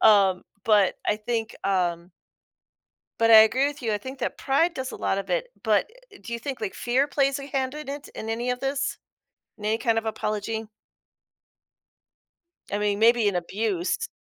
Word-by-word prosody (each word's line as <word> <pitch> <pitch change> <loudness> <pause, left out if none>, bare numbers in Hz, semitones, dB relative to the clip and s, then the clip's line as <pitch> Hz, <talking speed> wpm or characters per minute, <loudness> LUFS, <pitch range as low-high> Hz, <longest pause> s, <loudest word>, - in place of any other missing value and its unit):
um, 195 -4 +5 0.2
but 205 -4 +4
I 210 - +2
think, 225 +1 -3
um 175 -2 0 1.1
but 230 0 +4
I 220 - +11
agree 255 +5 +4
with 290 -1 -5
you. 225 -3 0
I 210 - 0
think 260 +5 -8
that - - -3
pride 325 +6 +2
does 260 -3 -4
a - - -7
lot 190 - 0
of 195 - -5
it, - - 0 0.2
but - - +2 0.3
do 235 - -8
you 235 - -2
think 260 0 -5
like 210 -3 -3
fear 255 +3 +1
plays 275 -1 +1
a 275 - -7
hand 265 -1 -2
in 300 -2 -7
it 285 +1 -6
in 220 - -6
any 235 +2 -1
of 250 0 -2
this, 275 0 -1 0.6
in 210 - -8
any 215 +1 +2
kind 230 -1 +1
of 225 - -1
apology? 220 0 -3 2.1
I 205 - +1
mean, 205 -1 0
maybe 230 -1 +5
an 195 - 0
abuse. 190 - -1
225 Hz, 185 wpm, -25 LUFS, 210-270 Hz, 2.1 s, I